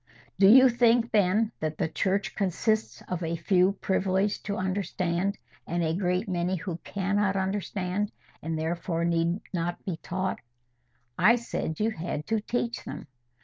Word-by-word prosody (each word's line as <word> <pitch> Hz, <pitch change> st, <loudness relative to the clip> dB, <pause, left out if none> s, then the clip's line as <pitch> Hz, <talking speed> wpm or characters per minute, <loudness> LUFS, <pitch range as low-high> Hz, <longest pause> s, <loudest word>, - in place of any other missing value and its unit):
"Do 195 Hz, -, +7 dB
you 260 Hz, +5 st, +9 dB
think, 235 Hz, -1 st, +3 dB
then, 210 Hz, +2 st, +3 dB
that 155 Hz, -1 st, -3 dB
the -, -, 0 dB
Church 195 Hz, +5 st, -1 dB
consists 215 Hz, +3 st, -1 dB
of 180 Hz, -1 st, -3 dB
a 165 Hz, 0 st, -1 dB
few 185 Hz, +2 st, +3 dB
privileged 195 Hz, +1 st, 0 dB
to 200 Hz, -, -1 dB
understand, 185 Hz, 0 st, -1 dB, 0.3 s
and 175 Hz, 0 st, -1 dB
a 160 Hz, 0 st, +1 dB
great 180 Hz, +2 st, 0 dB
many 180 Hz, 0 st, 0 dB
who 175 Hz, -1 st, -4 dB
cannot 200 Hz, +2 st, -1 dB
understand, 195 Hz, 0 st, -1 dB, 0.3 s
and 160 Hz, +1 st, -3 dB
therefore 165 Hz, +1 st, -1 dB
need 170 Hz, +2 st, +1 dB
not 175 Hz, 0 st, -3 dB
be 180 Hz, -4 st, -3 dB
taught?" 185 Hz, +3 st, -3 dB, 0.8 s
"I 235 Hz, -, +6 dB
said 230 Hz, -9 st, -4 dB
you 220 Hz, +2 st, +1 dB
had 165 Hz, -5 st, -4 dB
to 225 Hz, -1 st, +2 dB
teach 235 Hz, +1 st, -2 dB
them." -, -, -7 dB
190 Hz, 150 wpm, -27 LUFS, 170-205 Hz, 0.8 s, you